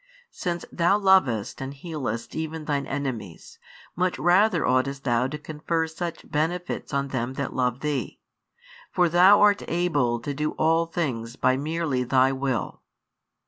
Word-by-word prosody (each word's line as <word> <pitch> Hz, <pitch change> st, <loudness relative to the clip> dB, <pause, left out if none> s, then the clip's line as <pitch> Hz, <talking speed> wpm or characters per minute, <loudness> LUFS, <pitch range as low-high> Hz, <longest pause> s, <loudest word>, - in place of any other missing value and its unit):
Since 175 Hz, -2 st, -4 dB
Thou 175 Hz, +4 st, +3 dB
lovest 185 Hz, -, +2 dB
and 135 Hz, +1 st, -5 dB
healest 135 Hz, -7 st, -5 dB
even 160 Hz, 0 st, -4 dB
Thine 140 Hz, -2 st, -1 dB
enemies, 130 Hz, -11 st, -5 dB, 0.4 s
much 180 Hz, +1 st, 0 dB
rather 180 Hz, -1 st, +3 dB
oughtest 130 Hz, +2 st, 0 dB
Thou 120 Hz, -1 st, +1 dB
to 150 Hz, +3 st, -5 dB
confer 155 Hz, +2 st, -2 dB
such 165 Hz, +1 st, -6 dB
benefits 175 Hz, +4 st, -2 dB
on 140 Hz, -1 st, -1 dB
them 130 Hz, -1 st, -2 dB
that 140 Hz, -1 st, -3 dB
love 125 Hz, 0 st, -1 dB
Thee. 150 Hz, -3 st, -3 dB, 0.7 s
For 180 Hz, -1 st, +3 dB
Thou 185 Hz, +4 st, +6 dB
art 205 Hz, -1 st, +5 dB
able 145 Hz, -9 st, +1 dB
to 145 Hz, +4 st, -4 dB
do 150 Hz, +2 st, -2 dB
all 165 Hz, +1 st, +2 dB
things 125 Hz, -9 st, -3 dB
by 130 Hz, -, +2 dB
merely 150 Hz, -2 st, -1 dB
Thy 130 Hz, +1 st, +3 dB
Will. 130 Hz, -3 st, -2 dB
150 Hz, 145 wpm, -25 LUFS, 130-170 Hz, 0.7 s, Thou